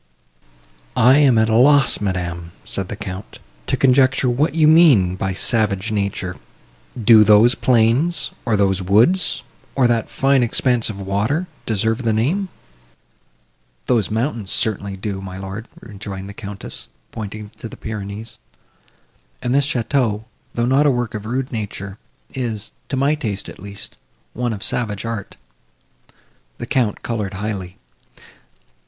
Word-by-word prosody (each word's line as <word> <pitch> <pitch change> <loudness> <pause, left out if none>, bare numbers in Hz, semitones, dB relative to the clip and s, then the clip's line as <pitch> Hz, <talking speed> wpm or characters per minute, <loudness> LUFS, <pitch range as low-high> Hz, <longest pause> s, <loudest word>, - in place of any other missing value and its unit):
"I 130 +5 +6
am 135 -5 +5
at 110 0 +4
a 110 - +1
loss, 135 0 +5
madam," 85 -3 -3
said 95 -2 -2
the - - -4
Count, 95 -1 -7 0.3
"to - - 0
conjecture 130 -1 +3
what 150 +6 0
you 155 -2 +5
mean 145 - +6
by 95 0 -2
savage 105 0 0
nature. 100 -3 -2 0.6
Do 110 -1 +7
those 105 +4 +6
plains, 125 +9 +2
or 110 -4 +1
those 95 -1 +2
woods, 115 - +3 0.3
or 130 - +3
that 120 -2 +1
fine 135 -1 +2
expanse 120 0 +2
of 100 -2 -6
water, 100 - -1 0.2
deserve 110 +2 0
the 115 -3 +1
name?" 165 - 0 1.4
"Those 115 -5 +1
mountains 110 -2 -2
certainly 100 -2 -1
do, 95 0 -4
my 95 -1 -7
lord," 95 +4 -7
rejoined 100 -2 -8
the 100 - -8
Countess, 100 -1 -6 0.2
pointing 105 -1 -7
to 115 - -7
the - - -11
Pyrenees, 105 0 -7 1.0
"and 120 - -2
this 140 0 +3
château, 120 -4 0 0.3
though 120 - +1
not 135 +4 +3
a - - +5
work 120 -4 -1
of 105 0 -5
rude 130 +3 -2
nature, 100 -3 -5 0.3
is, 115 -5 -3 0.2
to 135 - -2
my 140 +3 +2
taste, 110 -10 -3
at - - -10
least, 100 +1 -8 0.4
one 120 0 -2
of 105 -3 -5
savage 105 -3 -1
art." 115 -3 -5 1.2
The - - -5
Count 120 -6 0
coloured 105 -5 -3
highly. 95 -2 -5
110 Hz, 145 wpm, -20 LUFS, 100-125 Hz, 1.4 s, Do